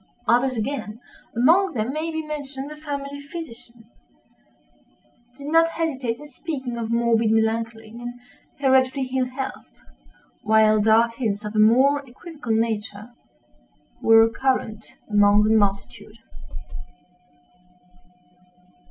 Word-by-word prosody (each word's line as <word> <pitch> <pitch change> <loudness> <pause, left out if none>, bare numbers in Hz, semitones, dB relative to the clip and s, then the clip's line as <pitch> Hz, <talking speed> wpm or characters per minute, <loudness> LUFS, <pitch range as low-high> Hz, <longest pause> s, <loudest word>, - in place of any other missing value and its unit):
Others 245 +2 +2
again 225 -2 -4 0.4
(among 335 +10 +3
them 225 +3 -2
may 310 +2 -3
be 320 -1 -4
mentioned 285 -2 -6
the - - -8
family 285 -2 -6
physician) 245 -7 -10 1.5
did 280 - -10
not 330 +2 +3
hesitate 270 -9 -3
in 295 - -11
speaking 270 -4 -6
of 230 -1 -4
morbid 230 -1 +2
melancholy, 225 0 -1
and 240 +2 -8 0.4
hereditary 265 -1 +2
ill 255 -1 +1
health; 265 +1 -7 0.6
while 215 0 +4
dark 225 +2 +3
hints, 210 -4 -2
of 210 +1 -6
a - - +2
more 260 +7 +4
equivocal 280 0 -8
nature, 220 -1 -2 0.9
were 225 0 +6
current 225 -3 -2
among 205 0 +4
the 220 +1 +3
multitude. 205 +1 -1
240 Hz, 110 wpm, -23 LUFS, 220-280 Hz, 1.5 s, were